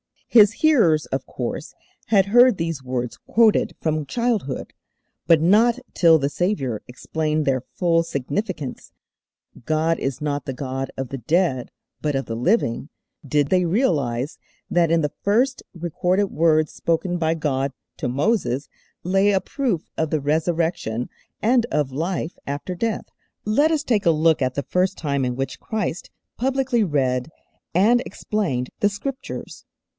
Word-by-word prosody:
His 215 -3 +7
hearers, 200 - +4
of - - -3
course, - - -5 0.3
had 200 -3 +4
heard 245 +1 +6
these 165 -4 -2
words 125 -2 -3
quoted 225 -2 +2
from 155 -2 -1
childhood, 220 - -2 0.5
but 165 -2 +5
not 220 +8 +4 0.2
till 165 -3 +6
the 140 -2 0
Saviour 145 - -1
explained 155 +4 -2
their 130 -2 +1
full 170 -2 +3
significance 155 - -4 0.7
'God 160 +1 +1
is 135 -2 -2
not 145 -2 -2
the 135 - -3
God 135 0 -4
of 135 -2 -4
the 135 - -4
dead, 135 - +1 0.3
but 150 -2 -1
of 135 - -1
the 115 - -4
living' 130 - 0 0.4
did 145 0 +1
they 180 -1 +3
realize 150 - 0 0.3
that 170 -2 +3
in 165 0 +3
the 150 -2 -1
first 250 +6 +2
recorded 180 +3 0
words 155 -1 +2
spoken 175 +2 -1
by 160 -1 +1
God 140 -3 -1 0.3
to - - -2
Moses 140 - 0 0.3
lay 195 +3 +3
a 190 -1 +2
proof 225 - -2
of 160 -1 0
the 155 -1 0
Resurrection 160 -5 -1 0.3
and 235 +1 +3
of 145 -3 0
life 165 +4 -3
after 145 +6 -4
death. 220 +5 -2 0.4
Let 280 +9 +3
us 310 -2 0
take 225 -8 +1
a - - +7
look 160 0 +3
at 130 -1 0
the 140 - -1
first 185 +4 0
time 140 -4 -1
in 125 -1 -2
which 135 +1 -4
Christ 210 -6 -3 0.3
publicly 260 -2 +1
read 130 -4 0 0.5
and 225 +7 +4
explained 160 -13 -2
the 205 - +3
Scriptures. 265 +6 -6
165 Hz, 150 wpm, -22 LUFS, 140-205 Hz, 0.7 s, His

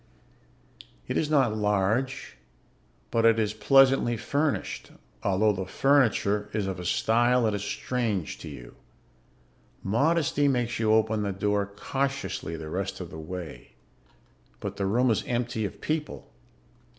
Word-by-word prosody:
It - - -3
is 150 - 0
not 135 -8 +3
large, 105 +5 0 0.8
but 115 - +2
it 115 0 +5
is 105 -2 0
pleasantly 135 0 +4
furnished 145 +5 -2 0.3
although 100 +2 +2
the 95 -1 -4
furniture 115 -5 +2
is 105 -2 -1
of 95 -2 -4
a 90 - -6
style 120 +6 +2
that 110 -2 +1
is 105 - -2
strange 110 -8 -2
to - - -8
you. - - -10 1.1
Modesty 145 - +2
makes 120 -4 0
you 110 -1 +2
open 110 0 +2
the 100 -1 -1
door 100 +1 0
cautiously 105 -5 -3
the 80 - -7
rest 95 +3 -3
of 90 -2 -7
the 80 - -8
way. 80 -6 -8 0.9
But - - -5
the 100 - -1
room 120 +5 +3
is 110 - 0
empty 120 -2 -1
of 100 - -7
people. 155 -1 -4
110 Hz, 140 wpm, -27 LUFS, 100-130 Hz, 1.1 s, it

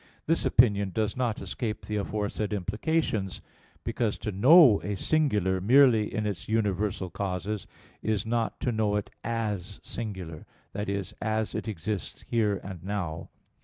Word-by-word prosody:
This 165 +2 +1
opinion 100 -5 +4
does 105 +2 -1
not 120 -4 -1
escape 110 -4 -4
the 105 - -2
aforesaid 105 +1 -2
implications; 105 - -1 0.4
because, 110 -4 -1
to 105 - -4
know 125 - +7
a 100 +2 -3
singular, 105 - +1
merely 120 -1 +5
in 110 -2 -2
its 100 -2 -4
universal 105 -4 0
causes, 100 +1 -3 0.3
is 110 -2 0
not 115 0 -1
to 125 - +1
know 110 -2 +1
it 105 - -2
as 105 -4 -3
singular, 95 -8 -6 0.3
that 100 0 -3
is, 100 -1 -3
as 110 +1 -1
it 110 0 -4
exists 105 0 -4
here 105 -4 +1
and 95 -4 -8
now. 90 -5 -3
105 Hz, 145 wpm, -28 LUFS, 100-115 Hz, 0.4 s, know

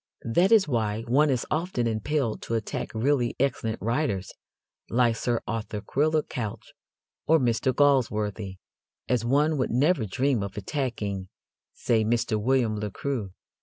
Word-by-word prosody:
That 175 - +2
is 215 -7 +6
why 110 -4 -1
one 140 +6 +3
is 130 -3 0
often 155 -6 0
impelled 115 +2 -1
to 115 - -3
attack 115 - -3
really 125 +1 +1
excellent 120 -4 0
writers, 115 -5 -1 0.6
like 120 -1 +3
Sir 120 0 -1
Arthur 110 -1 -3
Quiller 155 +7 +1
Couch 110 -5 -6 0.5
or 160 - +6
Mr. 125 -1 +1
Galsworthy, 110 -8 +1 0.5
as 125 -3 +1
one 145 +5 +2
would 130 - 0
never 135 -1 +2
dream 130 +3 +1
of 100 +1 -5
attacking, 105 -5 -3 0.5
say, 110 -2 +1
Mr. 110 -1 0
William 120 -3 +1
Le 105 0 -3
Queux. 120 -1 -3
120 Hz, 140 wpm, -26 LUFS, 110-140 Hz, 0.6 s, is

